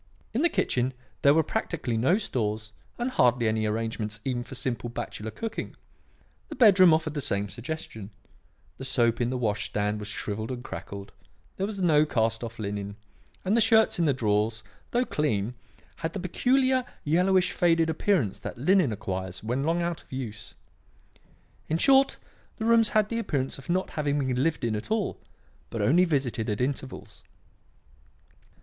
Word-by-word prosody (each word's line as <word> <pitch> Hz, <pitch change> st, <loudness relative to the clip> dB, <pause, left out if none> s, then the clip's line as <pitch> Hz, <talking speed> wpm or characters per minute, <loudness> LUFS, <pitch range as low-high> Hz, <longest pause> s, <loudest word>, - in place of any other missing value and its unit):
In 240 Hz, -, +1 dB
the 340 Hz, -, +4 dB
kitchen 130 Hz, -, 0 dB, 0.3 s
there 140 Hz, -, +6 dB
were 160 Hz, -, +4 dB
practically 155 Hz, -, -2 dB
no 130 Hz, -, +3 dB
stores 110 Hz, -, -2 dB, 0.3 s
and 245 Hz, +2 st, -1 dB
hardly 125 Hz, -, +3 dB
any 110 Hz, 0 st, +1 dB
arrangements 110 Hz, -1 st, -2 dB
even 125 Hz, -2 st, -1 dB
for 125 Hz, -, -9 dB
simple 120 Hz, -2 st, -2 dB
bachelor 110 Hz, -2 st, -5 dB
cooking; 225 Hz, -, -5 dB, 0.7 s
the -, -, -6 dB
bedroom 190 Hz, -7 st, +7 dB
offered 155 Hz, -1 st, +1 dB
the 145 Hz, -, -2 dB
same 100 Hz, -5 st, 0 dB
suggestion; 120 Hz, -3 st, -6 dB, 0.7 s
the -, -, -5 dB
soap 120 Hz, -3 st, +1 dB
in 120 Hz, -, +1 dB
the 130 Hz, -, -1 dB
wash 110 Hz, -4 st, -1 dB
stand 105 Hz, 0 st, -1 dB
was 105 Hz, -, -6 dB
shrivelled 110 Hz, +1 st, -4 dB
and 125 Hz, -1 st, -5 dB
cracked; 100 Hz, -5 st, -7 dB, 0.5 s
there 195 Hz, -, -1 dB
was 205 Hz, -2 st, -5 dB
no 155 Hz, -4 st, +5 dB
cast 115 Hz, -5 st, 0 dB
off 115 Hz, 0 st, -6 dB
linen, 100 Hz, -1 st, -4 dB, 0.5 s
and 195 Hz, +4 st, +2 dB
the 235 Hz, -, +4 dB
shirts 220 Hz, -4 st, +4 dB
in 170 Hz, -, +3 dB
the 145 Hz, -, +4 dB
drawers, 110 Hz, -2 st, 0 dB, 0.3 s
though 245 Hz, +1 st, +1 dB
clean, 120 Hz, -, 0 dB, 0.4 s
had 165 Hz, 0 st, -3 dB
the 200 Hz, -, -3 dB
peculiar 255 Hz, +8 st, +2 dB, 0.2 s
yellowish, 180 Hz, +4 st, +3 dB
faded 165 Hz, -3 st, +3 dB
appearance 160 Hz, -, +1 dB
that -, -, -6 dB
linen 170 Hz, -, +3 dB
acquires 95 Hz, -3 st, -4 dB
when 120 Hz, +5 st, -1 dB
long 170 Hz, +3 st, +1 dB
out 170 Hz, -1 st, -2 dB
of -, -, -26 dB
use. 115 Hz, -5 st, -6 dB, 1.1 s
In 160 Hz, -, +2 dB
short, 270 Hz, +7 st, +4 dB, 0.4 s
the 220 Hz, -, -3 dB
rooms 230 Hz, -1 st, +5 dB
had 215 Hz, -1 st, +2 dB
the 230 Hz, -, -1 dB
appearance 135 Hz, -, -2 dB
of 135 Hz, -, -14 dB
not 185 Hz, +2 st, 0 dB
having 145 Hz, -2 st, 0 dB
been 130 Hz, -3 st, 0 dB
lived 160 Hz, -2 st, 0 dB
in 115 Hz, -2 st, 0 dB
at 105 Hz, -, -5 dB
all, 220 Hz, -2 st, -1 dB, 0.5 s
but -, -, -5 dB
only 175 Hz, +7 st, +4 dB
visited 130 Hz, -9 st, -1 dB
at 105 Hz, -, -1 dB
intervals. 130 Hz, 0 st, -4 dB
135 Hz, 170 wpm, -27 LUFS, 110-180 Hz, 1.1 s, bedroom